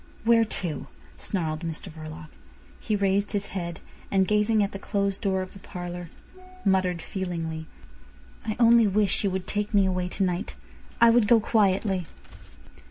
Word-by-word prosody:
"Where 230 0 +5
to?" 175 -8 -4 0.3
snarled 160 -5 -2
Mr 165 -2 -6
Verloc. 155 0 -9 0.5
He 215 - -1
raised 200 0 +1
his 200 -1 -1
head, 170 -3 -4 0.3
and 190 -1 +2
gazing 210 0 +3
at 200 - -2
the 195 - -6
closed 200 -1 -1
door 190 -2 +1
of 185 - -10
the 195 - -12
parlour, 175 -2 -7 0.6
muttered 185 -3 +2
feelingly: 165 -4 -4 0.8
"I 215 -2 -2
only 235 -1 +6
wish 200 0 +1
you 200 - +2
would 185 -1 -3
take 210 +1 -2
me 200 -1 +5
away 180 -1 -1
to 195 - -1
night. 180 +2 -2 0.4
I 235 0 +7
would 230 -2 +4
go 235 0 +6
quietly." 195 -4 +1
195 Hz, 160 wpm, -26 LUFS, 175-210 Hz, 0.8 s, I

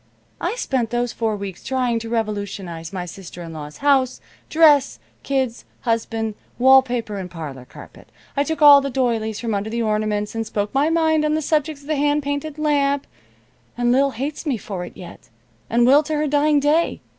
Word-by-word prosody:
I - - -1
spent 260 - -1
those 240 0 -1
four 220 -2 -1
weeks 200 -3 -7
trying 250 -3 0
to 225 0 -7
revolutionize 200 -7 -4
my 185 -2 -4
sister 175 0 -9
in 165 -1 -8
law's 150 -1 -8
house, 265 -3 +3 0.3
dress, 300 -4 +5 0.2
kids, 265 -4 -1 0.2
husband, 225 -1 -1 0.2
wall 265 +2 +7
paper 240 -5 -4
and 185 -2 -6
parlor 145 -7 -8
carpet. - - -14 0.3
I 280 - +2
took 315 0 -2
all 285 -1 +9
the 275 - -3
doilies 230 -5 -1
from 230 -1 -2
under 200 +2 -2
the 230 +1 -2
ornaments 210 -1 -1
and 225 0 -2
spoke 205 -1 -3
my 280 +3 +2
mind 320 -2 +2
on 305 0 +1
the - - +1
subject 300 -1 0
of - - -17
the 305 0 -1
hand 290 +1 +1
painted 285 +2 -3
lamp, 285 -2 +1 0.7
and 240 0 +2
Lil 275 +2 +3
hates 275 +4 -5
me 285 -7 -1
for 195 -3 -6
it 175 - -10
yet, 180 - -12 0.4
and 235 +1 +3
will 275 +4 +6
to 310 0 -3
her 300 +1 0
dying 295 +1 +3
day. 300 +4 +1
245 Hz, 190 wpm, -21 LUFS, 210-285 Hz, 0.7 s, all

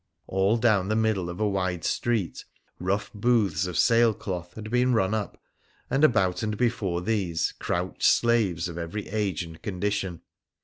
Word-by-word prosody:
All 95 +4 +2
down 110 -5 +3
the 110 - +1
middle 110 -5 +1
of 85 - -7
a 105 - +2
wide 95 -4 -1
street 115 -8 -1 0.4
rough 100 +3 -2
booths 105 -6 +1
of 90 - -4
sail 115 -1 +4
cloth 90 -3 -6
had 110 0 -7
been 125 +1 +3
run 95 -1 +2
up, 110 -2 -3 0.5
and 135 +3 +2
about 95 -11 +3
and 105 -1 -2
before 105 -8 0
these 95 -5 0
crouched 90 +1 -3
slaves 100 -8 +3
of 85 0 -6
every 85 +5 -5
age 100 -5 -1
and 80 -1 -11
condition. 100 -3 -2
100 Hz, 165 wpm, -26 LUFS, 90-110 Hz, 0.5 s, sail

